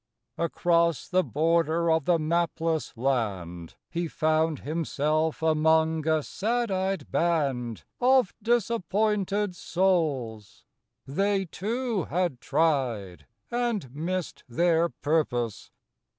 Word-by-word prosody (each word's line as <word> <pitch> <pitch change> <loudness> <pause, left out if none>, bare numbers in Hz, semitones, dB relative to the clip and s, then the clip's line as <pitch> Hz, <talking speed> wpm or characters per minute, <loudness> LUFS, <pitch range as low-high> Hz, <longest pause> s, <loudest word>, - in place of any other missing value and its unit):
Across 170 -1 +1
the 185 0 +3
border 165 +1 +1
of 160 -3 +2
the 175 -1 +4
mapless 165 -2 -1
land 100 -10 -2
He 170 0 -3
found 155 -1 +1
himself 155 +1 -1
among 160 0 +2
a 155 -1 +2
sad 235 +5 -1
eyed 190 -4 -2
band 135 -9 0 0.2
Of 255 -4 +4
disappointed 210 -3 0
souls; 145 - -1 0.4
they, 195 +7 0
too, 220 +3 -2
had 170 -6 -1
tried 125 - 0 0.2
And 235 - -1
missed 175 +4 -3
their 170 +5 +2
purpose. 135 -10 -1
165 Hz, 95 wpm, -27 LUFS, 145-185 Hz, 0.4 s, the